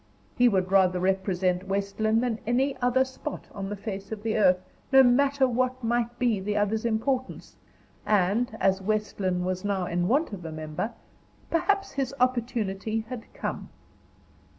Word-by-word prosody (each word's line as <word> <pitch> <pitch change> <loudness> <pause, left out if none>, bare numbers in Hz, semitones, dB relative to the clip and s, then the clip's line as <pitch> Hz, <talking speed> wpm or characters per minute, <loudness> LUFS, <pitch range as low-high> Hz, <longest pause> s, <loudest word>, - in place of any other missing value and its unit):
He 245 0 +5
would 190 -3 0
rather 185 -2 +4
represent 185 -1 0
West 200 +1 -2
Lynne 220 +1 +3
than 240 -3 -1
any 265 +3 +1
other 250 +1 +3
spot 265 +3 -7
on 195 -1 -5
the 205 - -3
face 200 -1 -6
of 215 -1 -5
the 225 -1 0
earth, 185 -4 +5 0.3
no 270 0 +8
matter 270 +2 +4
what 255 +1 -1
might 235 +1 0
be 235 -5 +1
the 205 +2 -2
other's 215 +2 0
importance; 250 +3 -2 0.5
and, 215 +3 +1
as 190 0 +2
West 215 +2 -2
Lynne 180 -2 0
was 185 0 -2
now 200 -3 0
in 175 0 -1
want 275 - +1
of 185 -3 -7
a 160 - -6
member, 155 +7 -4 0.6
perhaps 395 +4 +1
his 275 -1 -2
opportunity 225 -4 0
had 240 -3 -7
come. - - -4
215 Hz, 165 wpm, -27 LUFS, 190-245 Hz, 0.6 s, no